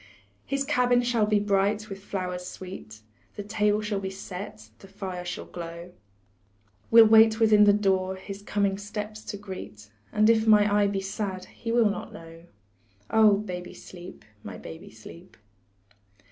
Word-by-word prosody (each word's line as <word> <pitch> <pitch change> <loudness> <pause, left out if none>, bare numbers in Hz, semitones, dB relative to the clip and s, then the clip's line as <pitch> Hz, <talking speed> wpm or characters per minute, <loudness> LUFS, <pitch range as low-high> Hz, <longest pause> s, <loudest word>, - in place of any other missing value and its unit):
His 275 0 -1
cabin 250 -4 +2
shall 235 -3 +1
be 210 -1 +3
bright 205 +1 0
with 195 -1 -9
flowers 180 -2 -4
sweet, 180 - -9 0.3
The 205 - -5
table 210 0 +1
shall 210 -1 -2
be 190 -1 -4
set, 180 - -9
the - - -14
fire 190 -2 -6
shall 175 0 -6
glow, 170 0 -8 1.0
We'll 230 0 +9
wait 220 0 +6
within 215 -2 +6
the 205 - +6
door, 190 -2 +1
his 195 +1 -9
coming 200 -1 -1
steps 210 +1 -6
to 205 - -5
greet, 185 - -10 0.2
And 215 0 +3
if 225 -1 +3
my 210 -1 +6
eye 205 -1 +4
be 200 -1 -2
sad, 195 -1 -4
he 230 - -5
will 235 -2 +4
not - - -7
know 165 0 -12 0.7
Oh, 215 -2 +5
baby, 180 -4 -6
sleep, 180 0 -12 0.2
my 95 -3 -8
baby, 160 - -10
sleep. 165 +11 -14
200 Hz, 160 wpm, -26 LUFS, 185-215 Hz, 1.0 s, We'll